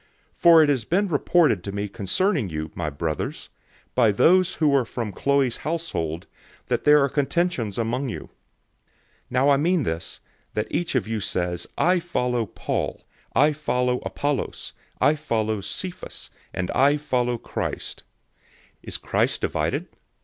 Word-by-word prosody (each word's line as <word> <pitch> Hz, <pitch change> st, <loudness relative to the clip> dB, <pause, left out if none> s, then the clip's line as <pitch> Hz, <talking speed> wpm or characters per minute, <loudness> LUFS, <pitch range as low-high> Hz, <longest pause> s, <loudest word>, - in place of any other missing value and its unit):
001:011 -, -, -29 dB
For 165 Hz, -2 st, +8 dB
it 150 Hz, -, +2 dB
has 135 Hz, -5 st, +1 dB
been 190 Hz, -, +1 dB
reported 150 Hz, -, +3 dB
to 100 Hz, -, -4 dB
me 100 Hz, +1 st, -3 dB
concerning 110 Hz, -, 0 dB
you, 80 Hz, -1 st, -4 dB
my 80 Hz, -3 st, -2 dB
brothers, 75 Hz, +2 st, -4 dB, 0.4 s
by 115 Hz, -4 st, +4 dB
those 185 Hz, -, +4 dB
who 150 Hz, -3 st, +2 dB
are 135 Hz, -2 st, +4 dB
from 115 Hz, -2 st, -4 dB
Chloe's 140 Hz, +3 st, +1 dB
household, 120 Hz, -, -3 dB, 0.4 s
that -, -, 0 dB
there 150 Hz, 0 st, +7 dB
are -, -, +3 dB
contentions 140 Hz, -, 0 dB
among 120 Hz, +4 st, -1 dB
you. -, -, -5 dB
001:012 -, -, -14 dB, 1.0 s
Now 130 Hz, +3 st, +3 dB
I 140 Hz, -, +5 dB
mean 170 Hz, +2 st, +2 dB
this, 80 Hz, -5 st, -3 dB, 0.4 s
that 105 Hz, -, 0 dB
each 170 Hz, -5 st, -1 dB
one 125 Hz, -, +4 dB
of -, -, -15 dB
you 110 Hz, -1 st, -2 dB
says, 90 Hz, -3 st, -2 dB
"I 180 Hz, +1 st, +3 dB
follow 125 Hz, -9 st, -1 dB
Paul," -, -, -3 dB, 0.3 s
"I 150 Hz, +2 st, +5 dB
follow 125 Hz, -4 st, 0 dB
Apollos," 145 Hz, -1 st, -3 dB, 0.3 s
"I 145 Hz, -, +5 dB
follow 110 Hz, -8 st, -1 dB
Cephas," 185 Hz, -, -6 dB, 0.2 s
and, 90 Hz, -1 st, -3 dB
"I 140 Hz, +2 st, +4 dB
follow 125 Hz, -4 st, 0 dB
Christ." -, -, -4 dB
001:013 -, -, -37 dB, 0.7 s
Is -, -, -4 dB
Christ -, -, 0 dB
divided? -, -, -1 dB
125 Hz, 155 wpm, -24 LUFS, 105-155 Hz, 1.0 s, For